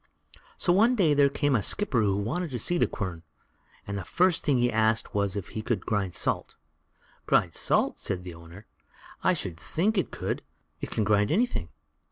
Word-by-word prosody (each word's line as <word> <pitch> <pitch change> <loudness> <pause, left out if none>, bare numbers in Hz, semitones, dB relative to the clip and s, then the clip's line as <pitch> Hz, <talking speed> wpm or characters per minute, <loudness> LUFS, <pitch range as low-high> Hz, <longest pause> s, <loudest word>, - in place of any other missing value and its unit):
So 175 - +2
one 225 +7 +4
day 170 -9 +3
there 140 -1 +4
came 145 0 +1
a 110 - +2
skipper 140 - +1
who 100 -2 +1
wanted 155 - -2
to 125 - -4
see 175 +9 0
the - - +3
quern; 90 -5 -5 0.6
and 100 0 -4
the - - -5
first 180 - +2
thing 140 -4 +2
he 120 0 +2
asked 110 0 +1
was 100 -1 0
if 100 -3 -6
it 110 0 -4
could 110 -7 -1
grind 100 -4 -1
salt. - - -1 0.7
"Grind - - +3
salt!" - - +1
said 90 -2 -3
the 90 -1 -8
owner; 85 +5 -13 0.6
"I - - +3
should 85 -3 -3
just - - -16
think 200 +5 +1
it - - -1
could. - - -3 0.4
It - - -5
can 110 - -1
grind 105 0 +2
anything." 195 - 0
110 Hz, 200 wpm, -27 LUFS, 100-160 Hz, 0.7 s, one